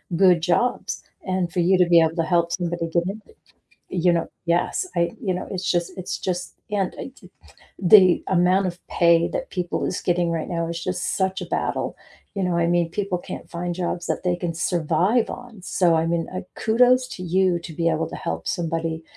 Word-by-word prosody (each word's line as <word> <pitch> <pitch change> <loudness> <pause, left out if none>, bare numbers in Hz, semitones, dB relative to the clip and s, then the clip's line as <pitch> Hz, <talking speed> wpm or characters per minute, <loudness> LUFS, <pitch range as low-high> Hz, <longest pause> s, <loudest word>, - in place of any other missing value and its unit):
good 180 -2 +5
jobs, 210 +9 0 0.2
and 185 -2 -1
for 180 - -2
you 180 +2 +4
to 180 - +5
be 170 -1 +7
able 160 +1 +2
to 165 - +1
help 170 0 +1
somebody 175 -2 -2
get 170 +1 +1
in, 210 +3 -5 0.7
you 175 -1 +3
know 170 -1 0 0.2
yes, 170 - +1
I 170 0 +2
you 185 -4 -1
know, 180 - -5
it's 190 -1 -3
just 175 +1 0
it's 185 - -4
just, 180 -1 -3 0.2
and 195 -3 -1
eh, - - -5
j - - -15 0.5
the 185 -1 +6
amount 185 +1 +3
of 175 0 -7
pay 170 -1 +4
that - - -4
people 180 -2 -2
is 185 - -2
getting 175 -1 +1
right 165 -1 -2
now 170 -2 -2
it's 170 0 -4
just 180 0 -2
such 190 0 0
a - - -5
battle, - - -2 0.4
you 195 - -2
know, 175 -1 0
I 170 0 +2
mean, 170 -1 +1
people 195 -2 -2
can't - - -8
find 175 0 -3
jobs 175 0 -3
that - - -2
they 180 -1 +1
can 175 -1 -3
survive 175 +8 +1
on, 240 -6 -9
so, 175 -3 +2
I 160 +1 +1
mean, 165 -1 -1
uh, 185 - -3
kudos 250 +3 +3
to 185 - -8
you 180 0 +2
to 170 - -9
be 165 +1 0
able 160 0 0
to - - -6
help 80 0 -4
somebody 165 -1 -2
175 Hz, 210 wpm, -23 LUFS, 170-185 Hz, 0.7 s, be